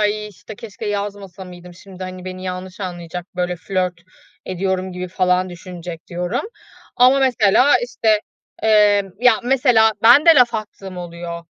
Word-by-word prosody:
"Ay, 210 0 0
işte, 200 +2 -12
keşke 220 0 -9
yazmasa 200 -2 -5
mıydım? 180 -1 -12
Şimdi, 185 0 -12
hani, 185 0 -7
beni 185 0 -7
yanlış 185 +1 -6
anlayacak, 175 -1 -6
böyle 180 0 -1
flört 185 0 -2 0.5
ediyorum 185 0 -2
gibi 180 0 -6
falan 185 0 +1
düşünecek" 175 -2 -9
diyorum. 180 +6 -3 0.6
Ama 255 +2 +5
mesela, 255 0 +4
işte, 225 -3 +1 0.4
eee, 210 -2 +4 0.2
ya, 250 -2 +6
mesela, 245 -4 +4
ben 245 +8 +7
de 330 - +9
laf 245 -3 +4
attığım 200 -3 -7
oluyor. 170 -1 -7
190 Hz, 145 wpm, -19 LUFS, 180-220 Hz, 0.6 s, de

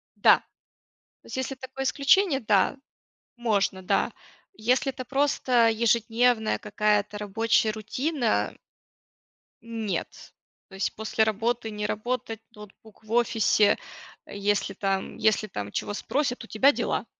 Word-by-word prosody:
да. - - +6 0.8
То - - -30
есть - - -7
если 260 +1 -3
такое 260 +1 -6
исключение, 280 +3 +3
да, 215 +5 +2 0.6
можно, 200 -5 0
да, - - +1 0.5
если 255 +4 +1
это 255 -1 -8
просто 255 -3 +2
ежедневная 225 0 +2
какая-то 210 0 0
рабочая 220 +2 +1
рутина 245 +4 -1 1.1
нет, 225 -6 -5 0.4
то 195 - -12
есть 190 - -1
после 220 0 0
работы 225 +2 -1
не 210 0 -4
работать, 225 +1 -3 0.2
ноутбук 210 +1 -15
в 215 - -13
офисе, 225 -3 +3 0.5
если 200 -1 -1
там 195 0 -2
если 215 0 +2
там 105 - -6
чего 205 - -3
спросят 245 +2 -2
у - - -11
тебя 265 +6 +4
дела. - - -2
225 Hz, 120 wpm, -26 LUFS, 210-245 Hz, 1.1 s, да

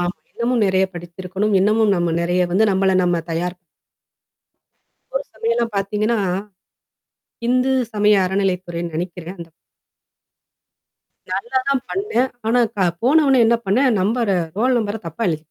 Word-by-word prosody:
ஆமா. 175 +1 -2 0.2
இன்னமும் 235 0 0
நறைய 190 0 +3
படிச்சிருக்கணும். 185 +4 -3
இன்னமும் 215 +1 +3
நம்ம 175 -1 0
நெறைய 175 +1 +1
வந்து 210 +5 +4
நம்மள 190 0 +2
நம்ம 175 -2 +1
தயார் 175 +2 -2 1.6
ஒரு - - 0
சமயம்லாம் 230 0 -1
பார்த்தீங்கன்னா. 210 +3 0 1.3
இந்து 255 +2 +2 0.2
சமய 210 0 +4
அறநிலைத்துறைன்னு 180 -3 -2
நினைக்கிறேன். 175 +1 -5
அந்த 170 -1 -9 1.8
நல்லா 235 +8 -1
தான் 275 -2 +1
பண்ணேன். 390 - 0 0.2
ஆனா 240 +2 +3 0.2
க - - -20 0.3
போன 300 +6 +5
ஒன்னே 265 -3 +5
என்ன 235 - +4
பண்ணேன் 245 +3 +3
நம்பர 225 +3 0 0.3
ரோல் 250 +2 +3
நம்பர 215 0 -3
தப்பா 165 +7 -8
எழுதிட் 155 -2 -2
205 Hz, 130 wpm, -20 LUFS, 180-235 Hz, 1.8 s, போன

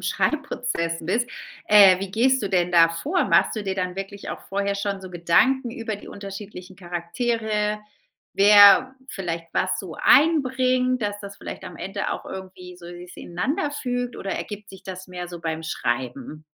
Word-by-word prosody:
Schreibprozess 245 - -1
bist, 230 +8 0 0.4
äh, 200 -3 +7
wie 195 0 -5
gehst 260 +4 +3
du 200 - -2
denn 180 -2 +1
da 165 -1 +6
vor? 290 - -1
Machst - - +3
du 210 - -4
dir 190 -1 -2
dann 180 -1 -3
wirklich 195 +1 -6
auch - - -6
vorher 200 0 -1
schon 200 -1 -3
so 185 -1 -10
Gedanken 230 +9 +2
über 225 -3 -4
die - - -14
unterschiedlichen 195 -2 -9
Charaktere? 210 +4 -2 0.5
Wer 205 +5 +7
vielleicht 170 -5 -4
was 185 0 0
so 175 -5 -9
einbringt, 255 -5 +3
dass 205 0 -2
das 200 0 -9
vielleicht - - -8
am - - -9
Ende 195 +2 -4
auch - - -6
irgendwie 185 -1 -9
so 175 -1 -13
si 175 +1 -10
ineinanderfügt 245 - -2
oder 195 - -5
ergibt 210 +1 -6
sich 190 0 -14
das 185 0 -8
mehr 180 -1 -6
so 175 -1 -9
beim 160 -1 -4
Schreiben? 130 +1 -4
195 Hz, 165 wpm, -23 LUFS, 180-230 Hz, 0.5 s, äh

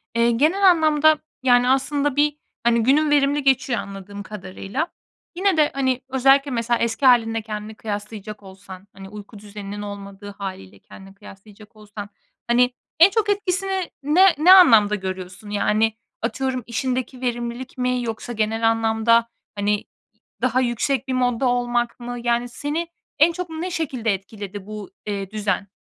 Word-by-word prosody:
Eee, 235 0 +3
genel 320 +12 +3
anlamda, 310 -2 +4 0.2
yani, 245 -1 +4
aslında 280 +1 +1
bir, 295 0 +2 0.3
hani, 235 -1 +3
günün 295 +5 +3
verimli 285 0 +2
geçiyor 265 -2 +2
anladığım 200 +1 -8
kadarıyla. 200 - -5 0.5
Yine 380 -1 +1
de, 300 -1 +3
hani, 260 -2 0
özellikle 270 +2 +3
mesela 235 -1 0
eski 235 +4 -1
hâlinle 225 -3 +4
kendini 215 0 -7
kıyaslayacak 210 0 -7
olsan, 190 0 -12
hani, 195 0 -11
uyku 210 +1 -11
düzeninin 205 0 -8
olmadığı 200 0 -8
hâliyle 100 - -8
kendini 195 - -14
kıyaslayacak 205 +2 -15
olsan, 210 -1 -9 0.4
hani, 245 +1 +3 0.3
en 340 +4 +9
çok 430 0 0
etkisini 385 -2 -1
ne, 345 +6 +5
ne 325 +5 +5
anlamda 225 - +7
görüyorsun? 190 +1 -7
Yani, 210 +2 +1 0.3
atıyorum 255 +2 -2
işindeki 255 +2 -3
verimlilik 240 +1 -4
mi 250 0 0
yoksa 230 +1 -5
genel 225 +1 +1
anlamda, 225 +1 +2 0.3
hani, 205 0 -1 0.6
daha 255 +1 +2
yüksek 250 +2 -1
bir 260 - -2
modda 250 0 +1
olmak 240 -1 -1
mı? 245 0 -6
Yani, 240 0 0
seni 295 +7 -3 0.3
en 315 +3 +6
çok 355 0 -6
ne 325 +3 -5
şekilde 260 -10 -1
etkiledi 200 0 -8
bu, 210 -1 -8 0.2
eee, 200 -2 -4
düzen? 200 -2 -2
235 Hz, 145 wpm, -22 LUFS, 210-275 Hz, 0.6 s, en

